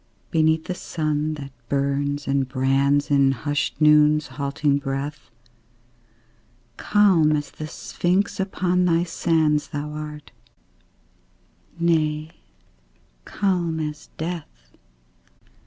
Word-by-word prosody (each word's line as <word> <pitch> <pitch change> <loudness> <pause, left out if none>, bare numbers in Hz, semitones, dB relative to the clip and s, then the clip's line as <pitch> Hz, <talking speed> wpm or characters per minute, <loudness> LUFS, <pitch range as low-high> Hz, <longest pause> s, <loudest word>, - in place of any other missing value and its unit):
Beneath 160 0 +2
the 180 - -3
sun 155 -3 -2
that 140 -2 -8 0.2
burns 140 +1 -1
and 135 -1 +1
brands 135 +2 +1
In 140 -1 +4
hushed 145 +2 -2
Noon's 150 -1 +5
halting 140 +1 0
breath, 140 +1 -5 1.5
Calm 185 - +3
as 145 -1 -2
the 155 - -7
Sphinx 180 +6 -1
upon 180 -2 +1
thy 170 -1 +3
sands 160 -3 +1
Thou 150 -1 -5
art 150 -1 -7 1.5
nay, 155 -2 +1 0.9
calm 175 -5 -1
as 150 -1 -5
death. 150 - -7
150 Hz, 95 wpm, -23 LUFS, 140-165 Hz, 1.5 s, Noon's